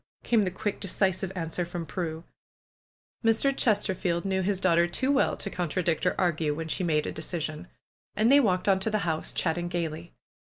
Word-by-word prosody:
came 230 -2 +3
the 190 - +1
quick, 195 +3 -3
decisive 190 -1 0
answer 165 0 -2
from 175 -1 -5
Prue. 160 0 -4 1.0
Mr. 230 +5 +3
Chesterfield 190 -6 +1
knew 190 -1 0
his 190 0 0
daughter 170 -2 +3
too 260 +10 0
well 280 - +2
to 200 - -4
con 175 -3 -2
tradict 170 +1 0
or - - +1
argue 160 -4 +1
when 160 +1 -4
she 170 - -2
made 155 -3 +1
a - - -3
decision. 160 0 -4 0.5
And 220 +4 +3
they 285 - +8
walked 185 -8 +1
on 195 -1 +4
to 190 - 0
the 215 -3 -1
house, 160 -2 -1
chatting 175 +1 -1
gaily. 170 -1 -4
180 Hz, 185 wpm, -28 LUFS, 165-195 Hz, 1.0 s, they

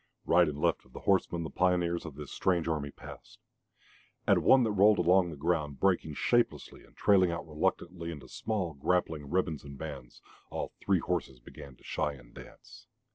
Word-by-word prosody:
Right 85 -1 +4
and 75 -1 -6
left - - +1
of 65 - -24
the - - -9
horsemen 85 -3 +1
the 80 - -6
pioneers 90 -2 +1
of 75 - -9
this 75 0 -9
strange 90 -3 0
army 75 -3 -1
passed. - - -12 0.9
At - - +5
one 130 -1 +5
that 110 - +1
rolled 105 +1 +5
along 90 0 +4
the 80 - -7
ground, 75 -2 -1
breaking 90 -6 +1
shapelessly 120 - 0
and - - -23
trailing 95 -3 +4
out 85 0 -5
reluctantly 85 +2 -2
into 75 -5 -8 0.2
long 90 -10 -1
grappling 80 -3 0
ribbons 80 -4 -1
and 70 -1 -10
bands, 70 -6 -8 0.3
all - - -4
three - - +2
horses 65 -2 -3
began 65 +2 -12
to - - -25
shy 75 -2 -2
and 65 -3 -16
dance. 115 -1 -14
85 Hz, 185 wpm, -30 LUFS, 75-95 Hz, 0.9 s, At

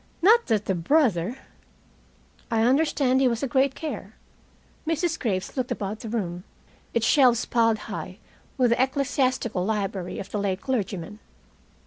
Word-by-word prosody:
Not 455 +5 +6
that 215 -3 +1
the 190 - 0
brother 215 - +1 0.6
" - - -33 0.4
"I 225 -1 +2
understand 265 0 +2
he 265 - +5
was 235 0 -1
a - - +1
great 265 +1 +2
care." 315 -2 -6 0.7
Mrs. 330 +1 0
Graves 190 -6 -2
looked 255 -2 -2
about 205 +2 -3
the 225 - -7
room, 180 -6 -3 0.5
its 230 -1 +1
shelves 245 -4 +4
piled 230 -2 +2
high - - -6 0.4
with 250 -3 +3
the 235 - +3
ecclesiastical 260 -6 0
library 195 -3 -2
of 195 - -7
the 210 - -2
late 195 -2 -1
clergyman. 210 -6 -3
235 Hz, 150 wpm, -25 LUFS, 200-265 Hz, 0.7 s, Not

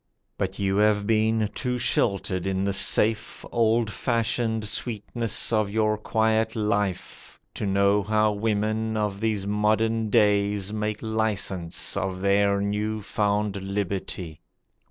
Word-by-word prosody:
But 95 0 -3
you 95 -1 0
have 105 -1 +3
been 110 0 +2
too 125 -2 -2
sheltered 95 -6 0
in 95 0 -1
the 100 0 0
safe, 110 +2 +2
Old 115 -1 +2
fashioned 115 -1 -1
sweetness 115 +1 -1
of 110 -2 +2
your 110 0 +1
quiet 110 +1 0
life, 105 -3 -3
To 105 - -3
know 100 +1 +3
how 105 +1 +2
women 110 +1 -1
of 105 -2 -2
these 110 -3 -1
modern 110 +2 +1
days 105 -2 +2
Make 105 0 -3
licence 105 -6 0
of 95 0 -2
their 100 0 +2
new 105 +1 -2
found 105 -1 -1
liberty. 95 -4 -4
105 Hz, 125 wpm, -25 LUFS, 100-110 Hz, -, have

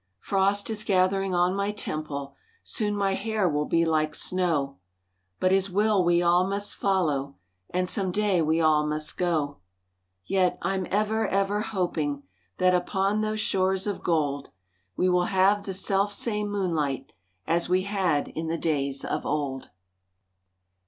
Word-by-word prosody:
Frost 200 - +1
is 215 -1 -1
gathering 190 -1 +1
on 175 +1 +2
my 200 +1 0
temple, 155 -8 -5 0.3
Soon 210 -3 0
my 195 -1 +1
hair 220 -1 0
will 150 -2 0
be 165 0 +2
like 155 -1 +1
snow, 160 - 0 0.6
But 185 - +2
His 195 0 +2
will 205 0 +2
we 175 0 +3
all 175 +2 +3
must 205 +1 -1
follow 150 -8 0 0.3
And 180 0 -1
some 190 -2 -1
day 205 -2 +1
we 160 +1 +1
all 155 -2 +4
must 150 0 -2
go. 155 -5 -1 0.7
Yet, 185 -2 +1
I'm 190 +1 -1
ever, 215 +2 +1
ever 195 +2 0
hoping 165 -9 -2 0.3
That 185 0 +3
upon 195 +3 +1
those 215 0 -1
shores 190 -2 +1
of 205 -2 -3
gold, 145 -4 -1 0.5
We 185 - +2
will 180 -1 +3
have 200 +2 +2
the 195 - -4
self 195 +1 +1
same 210 0 -1
moonlight 165 -9 -2 0.3
As 170 +1 0
we 185 +1 +2
had 185 -7 0
in 160 +1 -5
the 165 +1 -1
days 140 -4 -1
of - - -2
old. 140 -3 -3
185 Hz, 150 wpm, -26 LUFS, 160-200 Hz, 0.7 s, all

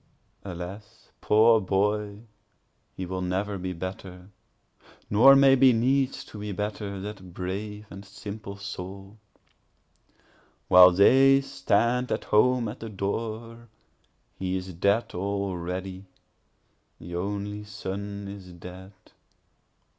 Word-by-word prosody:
5Alas, 100 +4 -9
poor 110 +1 +5
boy, 105 +2 -1 0.7
he 95 - -4
will 95 +1 -4
never 95 +2 -2
be 90 0 -4
better, 90 +1 -8 0.8
(nor 130 +7 +8
may 135 0 +6
be 130 -1 +6
needs 130 +3 +1
to 105 - -11
be 105 0 -5
better, 105 0 -4
that 95 -3 -9
brave 105 +3 -5
and 95 +1 -9
simple 100 +1 -8 2.1
soul;)While 90 0 +9
they 135 +9 +6
stand 125 -2 0
at - - -1
home 125 +2 +3
at 105 +4 -7
the 115 - -7
door, 115 +3 -5 0.7
he 95 0 -2
is 95 0 -7
dead 100 +7 +1
already; 95 -1 -4 0.9
The 85 +1 -8
only 100 +3 -4
son 100 0 -6
is 95 -2 -10
dead. 90 +3 -11
100 Hz, 110 wpm, -26 LUFS, 95-110 Hz, 2.1 s, soul;)While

